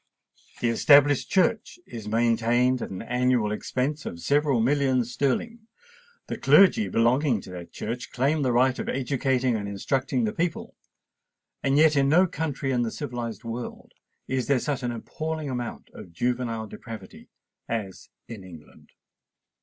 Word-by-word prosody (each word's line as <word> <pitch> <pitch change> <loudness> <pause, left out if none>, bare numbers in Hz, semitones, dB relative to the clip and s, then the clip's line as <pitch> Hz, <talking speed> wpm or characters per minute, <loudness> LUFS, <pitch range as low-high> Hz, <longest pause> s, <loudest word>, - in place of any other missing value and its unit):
The 120 - +2
Established 145 +3 +5
Church 220 - +1
is 110 -3 -8
maintained 120 +3 +2
at - - -4
an 95 +1 -6
annual 125 -2 +1
expense 130 +7 -2
of 85 - -6
several 140 - +2
millions 130 -1 +1
sterling; 220 - -1 0.6
the - - -6
clergy 205 +3 +5
belonging 120 +1 +2
to 95 - -11
that 85 -2 -9
Church 120 +7 -5
claim 140 +5 +1
the 130 -3 +1
right 125 +2 +2
of - - -3
educating 130 -2 0
and 100 -2 -3
instructing 130 - -1
the 215 -1 -1
people;—and 160 -5 -5
yet 155 0 +5
in 140 -1 +3
no 175 +5 +5
country 145 -5 -3
in 125 -2 +1
the 115 - 0
civilised 120 -6 -5
world 115 +1 -7 0.4
is 130 -1 -1
there 140 - +3
such 140 +1 -2
an 120 -1 -2
appalling 155 +5 -5
amount 125 -2 -5
of 85 - -11
juvenile 120 +3 -2
depravity 110 +1 -10 0.4
as 105 -5 -5 0.2
in 110 -5 -9
England! 85 -5 -14
125 Hz, 145 wpm, -26 LUFS, 115-145 Hz, 0.6 s, Established